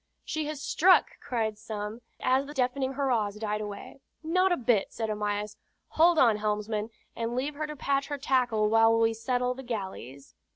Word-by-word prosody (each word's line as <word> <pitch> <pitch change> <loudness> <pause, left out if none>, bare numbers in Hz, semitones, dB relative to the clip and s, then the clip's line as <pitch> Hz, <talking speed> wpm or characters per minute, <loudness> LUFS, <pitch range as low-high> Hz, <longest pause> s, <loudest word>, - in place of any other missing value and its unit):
"She 310 -2 -2
has 305 -2 -5
struck!" 370 +3 +4
cried 220 -3 -2
some, 215 0 -6 0.2
as 265 +2 +1
the 295 - -9
deafening 260 +1 0
hurrahs 240 -7 0
died 210 0 -3
away. 205 +5 -8 0.2
"Not 365 +4 +2
a 355 - +2
bit," 230 -5 +1
said 220 -1 -3
Amyas. 210 0 -3 0.3
"Hold 335 +1 +4
on, 230 -7 +5
helmsman, 210 +1 -2 0.3
and 230 +1 -3
leave 275 +4 -1
her 305 +1 -4
to 300 - -6
patch 275 0 0
her 290 - -3
tackle 245 -6 +1
while 225 +1 +5
we 225 0 +3
settle 250 +2 -1
the 265 - -9
galleys." 190 - -6
230 Hz, 175 wpm, -28 LUFS, 210-275 Hz, 0.3 s, on